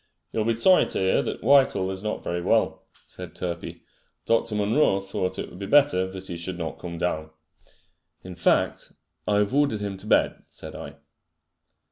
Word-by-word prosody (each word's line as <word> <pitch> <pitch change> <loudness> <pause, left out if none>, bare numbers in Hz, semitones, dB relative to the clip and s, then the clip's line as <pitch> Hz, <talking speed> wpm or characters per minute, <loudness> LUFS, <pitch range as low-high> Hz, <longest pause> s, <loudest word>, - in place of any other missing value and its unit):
"You'll 110 -1 -1
be 115 - +2
sorry 180 +12 +5
to - - -3
hear 95 0 +2
that - - -5
Whitehall 120 -8 +4
is 95 0 -5
not 105 +1 -3
very 85 0 -2
well," - - +1 0.2
said - - -10
Turpey. 85 -1 -5 0.4
"Dr. 115 -1 +1
Munro 105 0 +2
thought 95 -1 -3
it - - -5
would 90 - -11
be 100 - -5
better 135 -9 +4
that 95 0 -7
he 85 - -5
should 85 +1 -5
not 80 -2 -5
come 85 -1 -6
down." 80 -2 -2 0.9
"In 90 - -8
fact, 90 0 +1 0.3
I 105 - +2
have 105 +3 +1
ordered 140 -6 +2
him 100 -1 -4
to - - -10
bed," - - +2
said - - -10
I. - - -8
95 Hz, 180 wpm, -25 LUFS, 90-110 Hz, 0.9 s, sorry